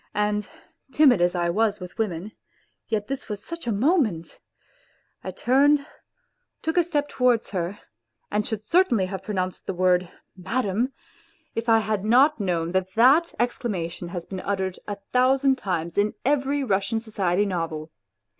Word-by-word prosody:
And 210 Hz, 0 st, 0 dB, 0.4 s
timid 265 Hz, -, +5 dB
as 175 Hz, +1 st, +2 dB
I 175 Hz, -1 st, +1 dB
was 210 Hz, +2 st, +1 dB
with 180 Hz, +4 st, -10 dB
women, 200 Hz, -2 st, -2 dB, 0.6 s
yet 215 Hz, -2 st, -1 dB
this 275 Hz, -2 st, -5 dB
was 205 Hz, 0 st, -5 dB
such 335 Hz, -5 st, -7 dB
a -, -, +1 dB
moment!... 220 Hz, -, +1 dB, 0.8 s
I -, -, -4 dB
turned, 280 Hz, +3 st, +3 dB, 0.8 s
took 320 Hz, -, -1 dB
a 355 Hz, -, +5 dB
step 300 Hz, -4 st, -1 dB
towards 250 Hz, -5 st, +1 dB
her, 185 Hz, +1 st, -3 dB, 0.5 s
and 210 Hz, +1 st, +1 dB
should 220 Hz, -1 st, -4 dB
certainly 245 Hz, -, +3 dB
have 190 Hz, 0 st, -5 dB
pronounced 185 Hz, -2 st, -4 dB
the 190 Hz, -, -2 dB
word 180 Hz, -1 st, +2 dB, 0.2 s
" -, -, -52 dB
Madam! 215 Hz, +5 st, -1 dB, 0.3 s
" -, -, -37 dB
if 230 Hz, +1 st, -2 dB
I 225 Hz, -, +6 dB
had 215 Hz, -2 st, -2 dB
not 255 Hz, +6 st, +4 dB
known 170 Hz, -4 st, -1 dB
that 185 Hz, 0 st, -1 dB
that 275 Hz, +9 st, +5 dB
exclamation 190 Hz, -8 st, -2 dB
has 175 Hz, -1 st, -6 dB
been 190 Hz, -, -6 dB
uttered 190 Hz, -1 st, -2 dB
a 205 Hz, -, -3 dB, 0.2 s
thousand 265 Hz, +1 st, +3 dB
times 170 Hz, -3 st, -2 dB
in 210 Hz, +1 st, +1 dB
every 280 Hz, 0 st, +1 dB
Russian 200 Hz, 0 st, 0 dB
society 205 Hz, -4 st, 0 dB
novel. 165 Hz, -4 st, -3 dB
210 Hz, 160 wpm, -24 LUFS, 185-255 Hz, 0.8 s, I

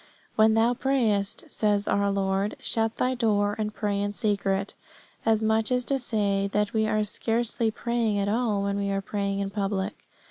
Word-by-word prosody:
"When 220 Hz, 0 st, +5 dB
thou 230 Hz, +2 st, +3 dB
prayest," 230 Hz, -7 st, 0 dB
says 205 Hz, -1 st, +1 dB
our 200 Hz, 0 st, +2 dB
Lord, 195 Hz, +1 st, 0 dB
"shut 225 Hz, -1 st, 0 dB
thy 255 Hz, +1 st, +1 dB
door 205 Hz, -4 st, +1 dB
and 215 Hz, 0 st, -1 dB
pray 205 Hz, -2 st, -1 dB
in 205 Hz, 0 st, -2 dB
secret." 200 Hz, -2 st, 0 dB, 0.5 s
As 220 Hz, -1 st, +3 dB
much 220 Hz, +1 st, +2 dB
as 250 Hz, -1 st, +1 dB
to 275 Hz, -1 st, 0 dB
say 200 Hz, -5 st, 0 dB
that 210 Hz, 0 st, +1 dB
we 220 Hz, -1 st, +2 dB
are 215 Hz, 0 st, +1 dB
scarcely 225 Hz, +2 st, 0 dB
praying 230 Hz, -1 st, -1 dB
at 200 Hz, 0 st, 0 dB
all 215 Hz, -2 st, +1 dB
when 200 Hz, 0 st, -1 dB
we 200 Hz, 0 st, -1 dB
are 195 Hz, 0 st, 0 dB
praying 200 Hz, -1 st, -2 dB
in 195 Hz, 0 st, -3 dB
public. 200 Hz, 0 st, -3 dB
210 Hz, 180 wpm, -26 LUFS, 200-225 Hz, 0.5 s, When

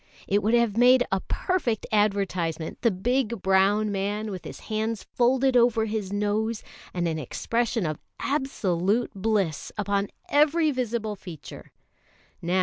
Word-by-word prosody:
It 205 Hz, +1 st, +2 dB
would 220 Hz, +4 st, +2 dB
have 235 Hz, -3 st, +2 dB
made 250 Hz, +1 st, +6 dB
a 195 Hz, -, +2 dB
perfect 300 Hz, -, -1 dB
advertisement 195 Hz, -6 st, 0 dB
the 235 Hz, -, +4 dB
big 235 Hz, +2 st, -1 dB
brown 195 Hz, +3 st, +3 dB
man 205 Hz, +2 st, -2 dB
with 185 Hz, -2 st, -7 dB
his -, -, -8 dB
hands 220 Hz, 0 st, -2 dB
folded 255 Hz, +2 st, +2 dB
over 235 Hz, -2 st, +4 dB
his 210 Hz, -3 st, -3 dB
nose, 210 Hz, +2 st, -1 dB, 0.3 s
and 175 Hz, -1 st, -1 dB
an 160 Hz, -1 st, -2 dB
expression 230 Hz, -, -1 dB
of 155 Hz, -2 st, -3 dB, 0.2 s
absolute 225 Hz, -, 0 dB
bliss 195 Hz, -6 st, -1 dB
upon 200 Hz, -1 st, 0 dB, 0.2 s
every 305 Hz, +2 st, +3 dB
visible 235 Hz, -5 st, -2 dB
feature. 175 Hz, -5 st, -11 dB
215 Hz, 135 wpm, -26 LUFS, 195-240 Hz, 0.3 s, made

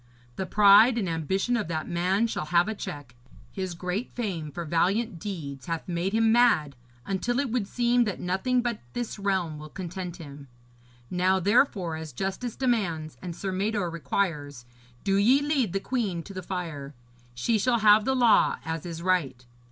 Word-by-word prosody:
The 190 Hz, -, -4 dB
pride 210 Hz, +4 st, +6 dB
and 205 Hz, -5 st, -1 dB
ambition 180 Hz, +8 st, 0 dB
of 220 Hz, -8 st, -1 dB
that 160 Hz, -2 st, -3 dB
man 185 Hz, +5 st, +1 dB
shall 225 Hz, -8 st, -3 dB
have 170 Hz, +3 st, +3 dB
a 220 Hz, -, -1 dB
check. 145 Hz, -, -7 dB, 0.4 s
His 185 Hz, -2 st, -4 dB
great 180 Hz, +7 st, -3 dB
fame 185 Hz, -10 st, -4 dB
for 170 Hz, +4 st, -5 dB
valiant 180 Hz, +5 st, 0 dB
deeds 145 Hz, -9 st, -6 dB
hath 165 Hz, -1 st, -3 dB
made 175 Hz, +2 st, -1 dB
him 225 Hz, +1 st, +3 dB
mad, 225 Hz, -, +3 dB, 0.3 s
until 235 Hz, +6 st, -1 dB
it 280 Hz, -4 st, -1 dB
would 230 Hz, -5 st, -1 dB
seem 240 Hz, +1 st, +2 dB
that 205 Hz, -, -3 dB
nothing 195 Hz, +8 st, 0 dB
but 240 Hz, -2 st, -2 dB
this 240 Hz, -3 st, -4 dB
realm 185 Hz, -6 st, -1 dB
will 155 Hz, 0 st, -9 dB
content 180 Hz, 0 st, -6 dB
him. 145 Hz, -4 st, -11 dB, 0.6 s
Now, 185 Hz, +1 st, +2 dB
therefore, 195 Hz, -, +2 dB
as 160 Hz, -2 st, -8 dB
justice 195 Hz, +5 st, -3 dB
demands, 175 Hz, -, -1 dB
and 175 Hz, -2 st, -6 dB
Sir 195 Hz, +1 st, -4 dB
Mador 200 Hz, -1 st, -1 dB
requires, 145 Hz, -4 st, -2 dB, 0.4 s
do 195 Hz, -1 st, +2 dB
ye 240 Hz, +8 st, +5 dB
lead 285 Hz, -, 0 dB
the 195 Hz, -, -1 dB
queen 200 Hz, -8 st, -2 dB
to 195 Hz, -, -10 dB
the 185 Hz, -, -5 dB
fire. 165 Hz, -7 st, -5 dB, 0.4 s
She 215 Hz, -, +1 dB
shall 240 Hz, +3 st, +2 dB
have 210 Hz, 0 st, +6 dB
the 265 Hz, +4 st, +1 dB
law 240 Hz, -3 st, +4 dB
as 160 Hz, +1 st, -4 dB
is 165 Hz, 0 st, -6 dB
right. 155 Hz, -9 st, 0 dB
190 Hz, 175 wpm, -27 LUFS, 165-220 Hz, 0.6 s, pride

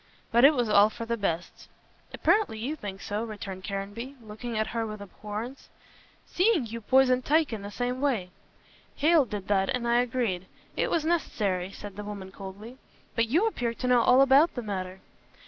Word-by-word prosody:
But 235 Hz, +2 st, +4 dB
it 290 Hz, +2 st, +8 dB
was 245 Hz, -3 st, +1 dB
all 210 Hz, 0 st, +6 dB
for 230 Hz, +1 st, -7 dB
the 235 Hz, 0 st, -1 dB
best." 175 Hz, -6 st, -3 dB, 0.4 s
"Apparently 415 Hz, -, +2 dB
you 255 Hz, +8 st, -3 dB
think 200 Hz, -8 st, -7 dB
so," 205 Hz, +2 st, -3 dB
returned 200 Hz, -4 st, -7 dB
Caranby, 205 Hz, +8 st, -5 dB
looking 225 Hz, +1 st, -6 dB
at 220 Hz, -, +1 dB
her 230 Hz, -1 st, 0 dB
with 215 Hz, -1 st, -7 dB
abhorrence, 210 Hz, +5 st, -7 dB, 0.6 s
"seeing 365 Hz, -, +2 dB
you 230 Hz, +1 st, -6 dB
poisoned 255 Hz, +2 st, +4 dB
Tyke 305 Hz, -2 st, +2 dB
in 215 Hz, -, -4 dB
the 200 Hz, -, -6 dB
same 245 Hz, +4 st, -3 dB
way." 225 Hz, -11 st, 0 dB, 0.6 s
"Hale 310 Hz, -1 st, +4 dB
did 205 Hz, -4 st, -6 dB
that 195 Hz, -2 st, +2 dB
and 250 Hz, -2 st, -1 dB
I 235 Hz, 0 st, +3 dB
agreed. 230 Hz, -8 st, -2 dB, 0.3 s
It -, -, 0 dB
was 320 Hz, -2 st, 0 dB
necessary," 200 Hz, -, 0 dB
said 205 Hz, -1 st, -9 dB
the 210 Hz, -, -5 dB
woman 200 Hz, -2 st, -7 dB
coldly, 200 Hz, +6 st, -10 dB, 0.3 s
"but 230 Hz, -1 st, +1 dB
you 330 Hz, -, +3 dB
appear 240 Hz, -, -1 dB
to 250 Hz, -, -3 dB
know 250 Hz, -1 st, +5 dB
all 250 Hz, +3 st, +6 dB
about 275 Hz, +5 st, +5 dB
the 245 Hz, -, -4 dB
matter." 190 Hz, -2 st, -5 dB
230 Hz, 185 wpm, -28 LUFS, 205-255 Hz, 0.6 s, it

